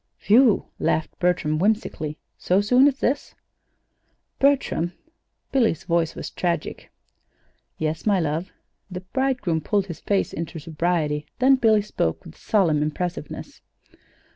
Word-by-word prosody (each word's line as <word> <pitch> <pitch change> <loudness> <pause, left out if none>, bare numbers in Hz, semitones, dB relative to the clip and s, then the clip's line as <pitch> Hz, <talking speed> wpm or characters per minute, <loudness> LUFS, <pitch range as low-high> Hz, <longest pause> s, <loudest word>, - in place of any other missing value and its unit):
"Whew!" 230 +1 +5
laughed 160 - 0
Bertram, 155 -4 +1
whimsically. 175 -6 -1 0.2
"So 185 +2 +1
soon 250 +7 +5
as 275 -2 +1
this?" 280 +3 -1 1.0
"Bertram!" 270 - +2 0.6
Billy's 230 - +1
voice 165 -1 0
was - - -6
tragic. 170 -3 -3 0.9
"Yes, 155 +5 -3
my 200 -3 +4
love." 160 +3 -2 0.4
The 180 -1 -6
bridegroom 240 - -1
pulled 200 +4 0
his 170 -4 -8
face 200 -1 0
into 165 +1 -5
sobriety; 155 -2 -1
then 260 +2 +5
Billy 220 -5 +3
spoke, 80 - -2
with 80 - -12
solemn 170 -8 +1
impressiveness. 155 +1 -4
180 Hz, 120 wpm, -23 LUFS, 160-220 Hz, 1.0 s, Whew